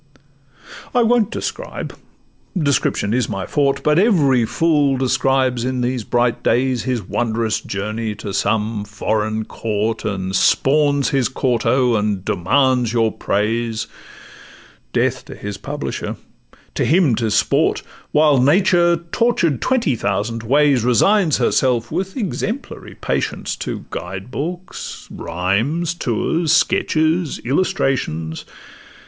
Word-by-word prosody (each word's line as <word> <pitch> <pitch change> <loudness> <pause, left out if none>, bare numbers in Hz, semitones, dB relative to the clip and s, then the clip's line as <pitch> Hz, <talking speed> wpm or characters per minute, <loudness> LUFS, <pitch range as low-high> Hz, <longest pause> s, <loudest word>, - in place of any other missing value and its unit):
I 245 - +5
won't 230 -2 +3
describe; - - -5 0.6
description 140 - +1
is 125 0 0
my 95 -3 -3
forte, 140 -1 0
But 150 +2 +3
every 145 - +3
fool 140 +2 +2
describes 130 -1 +1
in 130 0 -1
these 125 -1 -1
bright 120 +2 0
days 125 -1 +1
His 125 -4 -1
wondrous 115 -2 -1
journey 105 +2 -4
to 100 -1 -6
some 105 +1 0
foreign 110 +1 -2
court, 110 0 -2
And 95 -2 -3
spawns 140 +5 +3
his 135 -3 +1
quarto, 125 -1 +1
and 105 -2 -1
demands 125 +5 +2
your 115 -2 +2
praise— 110 +2 -1 1.1
Death - - 0
to - - -10
his 100 -1 -6
publisher, - - -5 0.6
to - - 0
him 160 -5 +3
'tis 110 -2 0
sport; - - +2 0.3
While 150 -3 +4
Nature, 175 +4 +4 0.2
tortured 180 - +1
twenty 235 - +1
thousand 110 +2 -2
ways, 135 +1 +3
Resigns 160 - +3
herself 120 -3 +1
with 190 +3 -3
exemplary 225 +3 -4
patience - - -2
To - - -5
guide 95 +6 -6
books, 175 +7 -6
rhymes, 115 - -1
tours, 160 +3 -1
sketches, 160 0 +2
illustrations. 130 - -1
125 Hz, 115 wpm, -19 LUFS, 110-150 Hz, 1.1 s, I